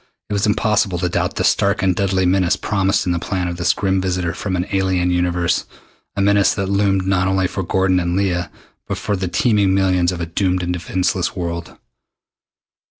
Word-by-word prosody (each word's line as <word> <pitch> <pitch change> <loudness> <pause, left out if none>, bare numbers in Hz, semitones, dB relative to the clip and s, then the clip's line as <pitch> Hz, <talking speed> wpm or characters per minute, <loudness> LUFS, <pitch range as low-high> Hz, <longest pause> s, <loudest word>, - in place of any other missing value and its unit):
It - - 0
was 100 +1 +1
impossible 105 -3 +1
to 90 0 -1
doubt - - -1
the - - -1
stark 100 0 +2
and 95 -1 +2
deadly 95 -2 +1
menace 90 -1 +2
promised 95 -2 0
in 90 - 0
the 85 - 0
plan 90 0 -2
of 85 0 -4
this 85 - +2
grim 95 -1 0
visitor 90 -2 -1
from 95 +1 -3
an 90 0 -1
alien 95 -2 +1
universe 90 -1 0 0.5
a 100 - -1
menace 100 -1 +3
that 95 -1 -2
loomed 100 -1 +1
not 95 -1 +1
only 95 0 +1
for 95 - -3
Gordon 95 0 +1
and 85 0 -1
Leah 90 -4 0 0.4
but - - -3
for 105 - -2
the 95 -1 -3
teeming 100 0 +2
millions 90 -2 +2
of 90 - -5
a 85 - -2
doomed 90 +2 -1
and 90 0 -1
defenseless 90 +1 -1
world. 85 -2 -5
95 Hz, 200 wpm, -19 LUFS, 90-95 Hz, 0.5 s, menace